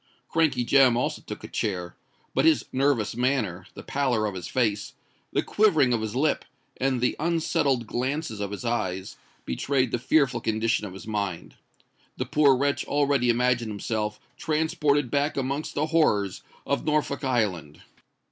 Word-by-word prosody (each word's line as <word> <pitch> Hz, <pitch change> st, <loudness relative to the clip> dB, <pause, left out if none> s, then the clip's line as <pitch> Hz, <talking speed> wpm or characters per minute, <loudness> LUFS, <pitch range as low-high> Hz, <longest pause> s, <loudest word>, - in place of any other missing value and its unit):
Crankey 140 Hz, -7 st, +2 dB
Jem 130 Hz, -2 st, +5 dB
also 125 Hz, -, -1 dB
took -, -, -8 dB
a -, -, -6 dB
chair; 90 Hz, -4 st, -3 dB, 0.4 s
but 135 Hz, -, +2 dB
his 160 Hz, -2 st, +4 dB
nervous 130 Hz, -6 st, +1 dB
manner, 115 Hz, -8 st, -1 dB
the -, -, -9 dB
pallor 130 Hz, -6 st, 0 dB
of 105 Hz, -, -2 dB
his 90 Hz, -2 st, -6 dB
face, 105 Hz, -5 st, -1 dB, 0.4 s
the -, -, +1 dB
quivering 155 Hz, -, +3 dB
of 115 Hz, -, 0 dB
his 110 Hz, +1 st, -4 dB
lip, 150 Hz, +4 st, +1 dB, 0.3 s
and 130 Hz, -2 st, 0 dB
the 125 Hz, -, +1 dB
unsettled 150 Hz, -6 st, +1 dB
glances 130 Hz, +1 st, -3 dB
of 100 Hz, -1 st, -2 dB
his 105 Hz, +4 st, -6 dB
eyes, 95 Hz, -5 st, -2 dB, 0.3 s
betrayed 130 Hz, -3 st, 0 dB
the 120 Hz, -, -1 dB
fearful 135 Hz, +2 st, +2 dB
condition 110 Hz, -1 st, 0 dB
of 95 Hz, -, -10 dB
his 95 Hz, -, -10 dB
mind. 100 Hz, -5 st, -3 dB, 0.6 s
The -, -, -2 dB
poor 145 Hz, -3 st, +4 dB
wretch 140 Hz, +2 st, 0 dB
already 140 Hz, -4 st, +2 dB
imagined 120 Hz, -1 st, +2 dB
himself 105 Hz, 0 st, -3 dB, 0.2 s
transported 150 Hz, -4 st, +1 dB
back 145 Hz, +1 st, 0 dB
amongst 140 Hz, +3 st, -2 dB
the 150 Hz, -, +1 dB
horrors 105 Hz, -, +1 dB, 0.2 s
of 140 Hz, -, -1 dB
Norfolk 150 Hz, -2 st, 0 dB
Island! 100 Hz, -, -1 dB
125 Hz, 155 wpm, -26 LUFS, 110-145 Hz, 0.6 s, Jem